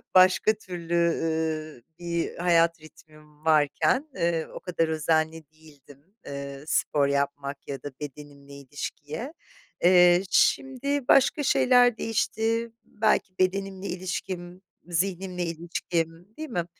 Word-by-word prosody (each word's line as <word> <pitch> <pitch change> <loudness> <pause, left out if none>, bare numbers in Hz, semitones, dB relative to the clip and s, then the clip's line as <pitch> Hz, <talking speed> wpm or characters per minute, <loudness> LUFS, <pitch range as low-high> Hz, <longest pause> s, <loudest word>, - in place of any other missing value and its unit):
başka 185 +4 +6
türlü, 175 -5 -7
ü 160 -4 -1 0.2
bir 170 -1 -2
hayat 170 -2 +3
ritmim 155 -1 -18
varken, 160 - +2
eee, 170 -2 0
o - - -6
kadar 170 -3 -1
özenli 160 0 0
değildim, 155 - -19
eee, 140 0 -7
spor 145 -1 +1
yapmak 140 0 -2
ya 135 -1 -6
da 145 - -6
bedenimle 140 -1 -10
ilişkiye. 145 - -7 0.5
Eee, 180 0 +6
şimdi 270 +3 +1
başka 280 +2 +4
şeyler 245 -3 +4
değişti, 225 +1 -1
belki 210 -3 0
bedenimle 195 +1 -1
ilişkim, 180 0 -5 0.3
zihnimle 180 +1 -2
ilişkim 165 0 -3
Değil 315 -1 -6
mi? 175 -8 -2
170 Hz, 110 wpm, -26 LUFS, 155-190 Hz, 0.5 s, başka